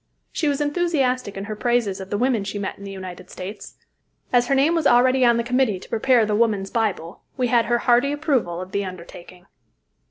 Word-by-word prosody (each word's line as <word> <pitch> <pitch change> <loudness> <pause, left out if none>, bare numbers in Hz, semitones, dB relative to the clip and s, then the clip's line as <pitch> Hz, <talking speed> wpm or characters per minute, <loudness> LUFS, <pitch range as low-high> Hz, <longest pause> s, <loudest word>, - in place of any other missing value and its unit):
She 310 - -1
was 285 0 0
enthusiastic 285 - 0
in 195 - -4
her 215 +1 -5
praises 235 -4 0
of 190 - -9
the 205 - -1
women 245 -2 +1
she 205 +1 -5
met 200 -1 -4
in 200 - -13
the 200 - -7
United 185 -2 -9
States. 195 +3 -8 0.6
As 245 0 +4
her 275 - +2
name 285 +5 +3
was 330 -4 +2
already 255 +2 +4
on 235 -1 +4
the 235 - 0
committee 245 -5 +1
to - - -14
prepare 235 0 +3
"The 210 - -1
Woman's 210 -3 +1
Bible," 200 -7 -2 0.2
we 250 -2 0
had 235 -1 +3
her 240 - +1
hearty 245 +3 +2
approval 275 - -1
of 185 +1 -7
the 200 0 -1
undertaking. 180 -1 -10
235 Hz, 215 wpm, -22 LUFS, 195-255 Hz, 0.6 s, As